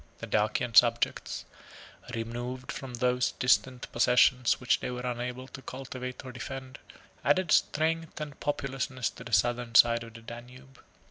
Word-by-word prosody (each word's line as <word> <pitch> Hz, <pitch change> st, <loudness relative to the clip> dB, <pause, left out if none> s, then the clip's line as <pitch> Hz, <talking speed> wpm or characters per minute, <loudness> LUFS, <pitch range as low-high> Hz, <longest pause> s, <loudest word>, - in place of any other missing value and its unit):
The -, -, -6 dB
Dacian 110 Hz, +3 st, 0 dB
subjects, 115 Hz, -, +3 dB, 0.7 s
removed 120 Hz, +3 st, -5 dB
from 130 Hz, -2 st, -6 dB
those 125 Hz, +1 st, +1 dB
distant 125 Hz, 0 st, +2 dB
possessions 125 Hz, +1 st, +4 dB
which 125 Hz, -, +2 dB
they -, -, -4 dB
were 125 Hz, 0 st, -4 dB
unable 125 Hz, +1 st, -4 dB
to 135 Hz, -, -10 dB
cultivate 130 Hz, -1 st, -7 dB
or 130 Hz, -, -6 dB
defend, 130 Hz, +2 st, -7 dB, 0.4 s
added 185 Hz, -4 st, +2 dB
strength 160 Hz, +1 st, +1 dB
and 150 Hz, -1 st, -7 dB
populousness 135 Hz, -3 st, -2 dB
to -, -, -11 dB
the 120 Hz, -, -9 dB
southern 120 Hz, +3 st, +1 dB
side 115 Hz, 0 st, +6 dB
of 115 Hz, 0 st, -12 dB
the 115 Hz, -, -10 dB
Danube. 125 Hz, +3 st, -12 dB
125 Hz, 145 wpm, -29 LUFS, 120-130 Hz, 0.7 s, side